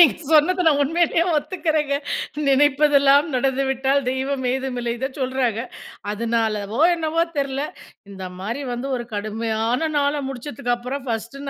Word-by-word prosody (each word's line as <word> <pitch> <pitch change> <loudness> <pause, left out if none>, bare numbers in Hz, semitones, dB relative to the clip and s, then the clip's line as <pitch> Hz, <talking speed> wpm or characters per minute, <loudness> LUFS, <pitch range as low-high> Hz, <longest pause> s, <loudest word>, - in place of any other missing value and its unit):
நீங்க 335 - +7 0.2
சொன்னத 355 +4 +4
நான் 290 -2 +3
உண்மையிலேயே 335 +3 +2
ஒத்துக்குறேங்க. 310 -3 0 0.5
"நினைப்பதெல்லாம் 285 +1 +5
நடந்துவிட்டால் 270 +1 +1
தெய்வம் 265 +1 -2
ஏதுமில்லை," 250 -3 -2
இதச்சொல்றாங்க. 260 -3 -1 0.5
அதனாலவோ 220 0 -1
என்னவோ 330 0 0
தெர்ல, 275 -1 -1 0.5
இந்த 190 -1 -7
மாரி 230 +9 -4
வந்து 245 +3 -4
ஒரு 240 -1 -5
கடுமையான 220 +3 -1 0.2
நாள 285 0 +2 0.2
முடிச்சதுக்கப்புறம், 250 -1 -7 0.4
நான் 225 - +2
1 230 +5 -12
265 Hz, 115 wpm, -22 LUFS, 235-290 Hz, 0.5 s, நீங்க